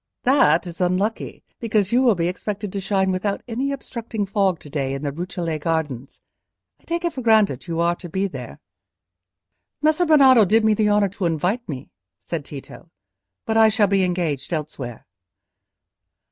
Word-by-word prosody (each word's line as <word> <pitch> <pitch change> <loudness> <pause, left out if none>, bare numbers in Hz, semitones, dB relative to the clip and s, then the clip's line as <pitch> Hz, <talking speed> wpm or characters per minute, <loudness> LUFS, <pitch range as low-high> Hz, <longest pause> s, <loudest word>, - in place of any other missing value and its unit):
"That 180 - +4
is 175 0 -7
unlucky, 185 +5 -1 0.2
because 210 -4 0
you 245 +2 +4
will 240 -5 +4
be 170 -1 0
expected 200 +2 -4
to 200 - -2
shine 190 0 0
without 200 +2 -2
any 255 +4 -2
obstructing 235 -5 -4
fog 195 -2 +1
to - - -12
day 140 -2 -2
in 135 - -6
the 145 - -1
Rucellai 170 0 -4
Gardens. 150 -5 -3 0.6
I - - -29
take 340 +1 -2
it 340 - -1
for 260 - -5
granted 215 - +2
you 165 -1 -3
are 170 +1 +2
to 175 - -9
be 190 +4 -1
there." 195 - -7 1.2
"Messer 310 +3 +2
Bernardo 265 -7 +7
did 220 +3 +3
me 220 - +4
the 210 0 +2
honour 205 -1 +3
to 190 0 -4
invite 180 +8 -1
me," 135 -2 -7 0.3
said 165 -4 -5
Tito; 145 +5 -10 0.6
"but 220 - 0
I 220 0 +7
shall 215 -1 +3
be 195 -1 +2
engaged 175 -6 -2
elsewhere." 145 -7 -5
195 Hz, 175 wpm, -22 LUFS, 165-220 Hz, 1.2 s, Bernardo